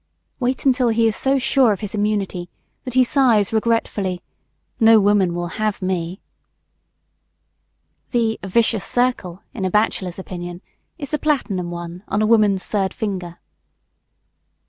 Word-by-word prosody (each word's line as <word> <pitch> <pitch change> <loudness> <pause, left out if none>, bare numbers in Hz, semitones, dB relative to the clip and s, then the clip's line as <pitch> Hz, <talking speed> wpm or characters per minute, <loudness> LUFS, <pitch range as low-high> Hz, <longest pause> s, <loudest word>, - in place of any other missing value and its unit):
Wait 255 +1 -1
until 255 -2 +3
he 230 0 +2
is 220 -1 +2
so 270 +1 +1
sure 265 -2 +3
of 195 - -7
his 210 -1 -5
immunity 205 -4 -1 0.4
that 255 -1 -6
he 260 - +6
sighs 235 -6 +2
regretfully, 215 -5 0 0.6
"No 225 -1 +7
woman 200 -4 +2
will 175 +4 -4
have 215 -1 0
me!" 185 0 -3 1.9
The 225 -3 0
"vicious 220 +1 +1
circle" 245 -8 -1
in 195 - -5
a 185 - +1
bachelor's 185 -3 0
opinion, 175 -1 -7 0.3
is 285 -5 -7
the 300 - 0
platinum 220 - -1
one 175 +1 -7
on 205 - -1
a 215 - +2
woman's 210 -4 +3
third 195 -3 -1
finger. 185 -6 -4
210 Hz, 140 wpm, -20 LUFS, 185-235 Hz, 1.9 s, No